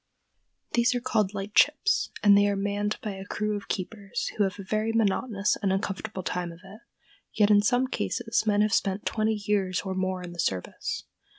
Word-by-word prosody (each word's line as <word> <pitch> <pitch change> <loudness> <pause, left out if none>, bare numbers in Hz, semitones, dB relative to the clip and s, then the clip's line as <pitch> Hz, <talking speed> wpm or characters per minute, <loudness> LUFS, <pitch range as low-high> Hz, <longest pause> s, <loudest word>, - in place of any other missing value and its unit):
These 240 +1 +2
are - - +1
called 215 -4 0
"lightships," 290 - +2
and 205 -1 +7
they 205 0 +5
are 200 - +1
manned 205 +1 -1
by 215 - -2
a 190 -1 -7
crew 210 +1 -2
of 205 - -6
keepers 200 +1 -3
who 210 - +2
have 195 0 -1
a 200 - -7
very 215 +3 -1
monotonous 210 -1 +1
and 195 -2 +1
uncomfortable 195 0 -3
time 180 -1 -2
of 165 +1 -13
it; 195 +3 -12 0.5
yet 210 -1 +4
in 205 0 +6
some 245 +5 +2
cases 235 -3 -1
men 205 -1 +3
have 210 0 +2
spent 195 0 0
twenty 220 0 +1
years 190 -3 +1
or 190 -1 -4
more 185 -1 -2
in 175 -1 -7
the 175 - -12
service. 95 - -2
205 Hz, 195 wpm, -27 LUFS, 190-215 Hz, 0.5 s, and